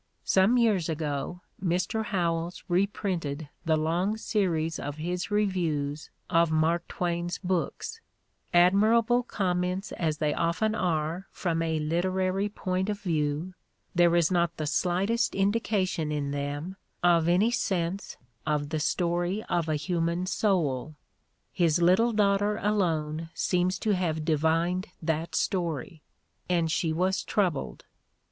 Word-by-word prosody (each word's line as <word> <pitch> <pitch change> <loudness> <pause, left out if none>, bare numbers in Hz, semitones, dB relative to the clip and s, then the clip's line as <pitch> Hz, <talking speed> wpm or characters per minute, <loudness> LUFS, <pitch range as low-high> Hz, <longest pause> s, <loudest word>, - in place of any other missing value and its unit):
Some 195 +6 +4
years 210 -8 +2
ago 155 +2 -3 0.2
Mr. 180 +5 0
Howells 175 -5 -1
reprinted 175 -6 -1 0.2
the 160 -1 +3
long 175 +7 0
series 165 -8 0
of 145 +1 -5
his 175 +4 -3
reviews 165 -8 -1 0.2
of 165 0 +3
Mark 160 +2 +1
Twain's 175 0 -2
books; 180 -4 -3 0.5
admirable 220 +7 +4
comments 185 -3 -1
as 155 -3 -1
they 150 -1 0
often 170 +6 0
are 170 -1 -1
from 165 -3 -1
a 160 -1 0
literary 185 +5 0
point 185 -1 -2
of 205 -1 -2
view, 160 -1 -1 0.4
there 175 -1 +4
is 170 0 +3
not 170 -2 +1
the 155 - -2
slightest 190 +9 +1
indication 195 -5 0
in 145 -2 -2
them 145 +6 -4 0.3
of 170 -2 +4
any 195 +7 +4
sense 190 -4 -2 0.3
of 150 -1 -1
the 155 0 -1
story 175 +5 0
of 170 -2 0
a 155 - +1
human 170 +3 -1
soul. 155 - 0 0.6
His 170 -2 +2
little 185 +8 +4
daughter 205 -1 +2
alone 165 -7 0
seems 180 0 +1
to 215 - 0
have 160 -4 -1
divined 165 +3 +1
that 160 0 -2
story, 165 - -2 0.5
and 170 -3 +1
she 165 -1 0
was 185 +4 0
troubled. 180 -9 -1
175 Hz, 125 wpm, -28 LUFS, 160-190 Hz, 0.6 s, Some